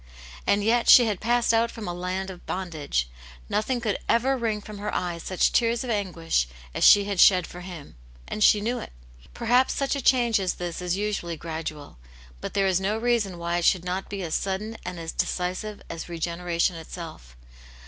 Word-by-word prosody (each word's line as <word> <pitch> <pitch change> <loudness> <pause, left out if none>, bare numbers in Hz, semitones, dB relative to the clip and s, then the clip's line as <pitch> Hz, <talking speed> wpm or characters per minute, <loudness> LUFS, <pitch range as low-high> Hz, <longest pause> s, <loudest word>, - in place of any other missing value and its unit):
And 200 0 +3
yet 230 +2 +2
she 245 - +9
had 210 -4 -1
passed 240 +1 +2
out 230 +1 +3
from 225 -4 -7
a 175 - -2
land 185 +2 -3
of 180 - -13
bondage; 155 - -2 0.4
nothing 245 +4 0
could 215 -5 -1
ever 260 +4 +3
wring 225 -4 -1
from 210 0 -10
her 210 - -3
eyes 175 -2 -2
such 185 +1 +1
tears 235 0 +2
of 250 - -3
anguish 170 - 0 0.3
as - - -2
she 205 - +8
had 200 -2 -3
shed 180 -3 +6
for 180 - -10
him; 175 - -9 0.3
and 215 - -1
she 210 - +6
knew 240 +4 -1
it. - - -9 0.4
Perhaps 245 +2 +2
such 275 0 0
a 280 - -2
change 240 -4 +3
as 185 -2 -1
this 175 -1 -5
is 180 +1 -1
usually 200 -5 -2
gradual. 155 - -6 0.4
But - - -6
there 195 -1 +3
is 190 -1 +2
no 205 +3 0
reason 225 -6 0
why 170 0 -1
it 170 - -1
should 180 -2 +3
not 185 +2 -3
be 200 -2 -4
as 160 -2 -4
sudden 200 +3 -2
and 180 -1 -6
as 165 0 -5
decisive 185 +4 -3
as 165 +1 -7
regeneration 170 +1 -1
itself. 160 - -9
190 Hz, 200 wpm, -26 LUFS, 175-220 Hz, 0.4 s, she